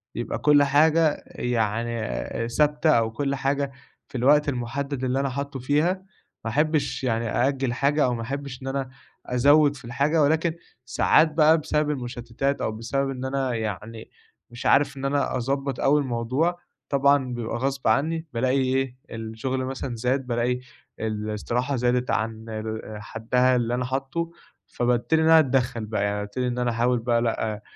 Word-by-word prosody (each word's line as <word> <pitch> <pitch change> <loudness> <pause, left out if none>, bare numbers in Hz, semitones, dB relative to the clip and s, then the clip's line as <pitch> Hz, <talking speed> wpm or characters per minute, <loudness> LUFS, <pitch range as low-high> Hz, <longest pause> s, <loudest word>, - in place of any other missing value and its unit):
يبقى 120 - -3
كل 145 -1 +5
حاجة 155 +2 +3
يعني 115 0 -2
ثابتة 150 +4 +2
أو 115 -5 +2
كل 140 +4 -1
حاجة 140 +1 -1 0.4
في - - -6
الوقت 145 +4 +4
المحدَّد 135 +2 -3
اللي 130 +1 0
أنا 135 0 0
حاطُّه 140 +1 -4
فيها، 145 +7 +2 0.5
ما 115 - -1
أحبِّش 145 -1 0
يعني 115 -2 0
أأجِّل 130 +2 0
حاجة 140 +4 +2
أو 125 - +1
ما 115 - -4
أحبِّش 135 +2 -5
إن 135 - -7
أنا 135 -1 -2 0.4
أزوِّد 145 +4 +4
في 125 - -12
الحاجة، 140 +7 +1
ولكن 160 +3 +2 0.3
ساعات 155 +6 +3
بقى 155 +1 +5
بسبب 150 -1 0
المشتِّتات 125 0 -3
أو - - 0
بسبب 115 +5 -2
إن 130 -1 -4
أنا 130 -1 -1
يعني، 110 0 -5 0.4
مش 120 0 -9
عارف 140 0 +3
إن 135 - -4
أنا 140 0 0
أضبَّط 135 +1 -2
أوي 145 +2 +3
الموضوع، 130 +7 -1 0.3
طبعًا 140 -2 +3
بيبقى 120 -1 -3
غصب 135 +1 -2
عني 160 +8 +1
بالاقي 130 +3 +1
إيه، 130 0 0 0.2
الشغل 115 +4 -3
مثلًا 130 -1 -4
زاد، 125 +3 -1
بالاقي 120 +1 0 0.4
الاستراحة 110 +5 -2
زادِت 125 0 +1
عن 110 0 -2
آآ 110 0 -5
حدَّها 125 +4 +1
اللي 120 -1 0
أنا 125 +1 -1
حاطُّه، 135 +6 -3 0.4
فبابتدي 125 +6 +1
إن - - +2
أنا 160 0 +8
أتدخَّل 130 -5 +1
بقى، 105 -1 -1
يعني 105 0 0
بابتدي 105 +5 -3
إن 125 0 -2
أنا 125 -1 +1
أحاول 120 +1 +1
بقى 115 0 +1
لأ، 110 -2 -1
أ 105 - -12
130 Hz, 165 wpm, -25 LUFS, 115-140 Hz, 0.5 s, أنا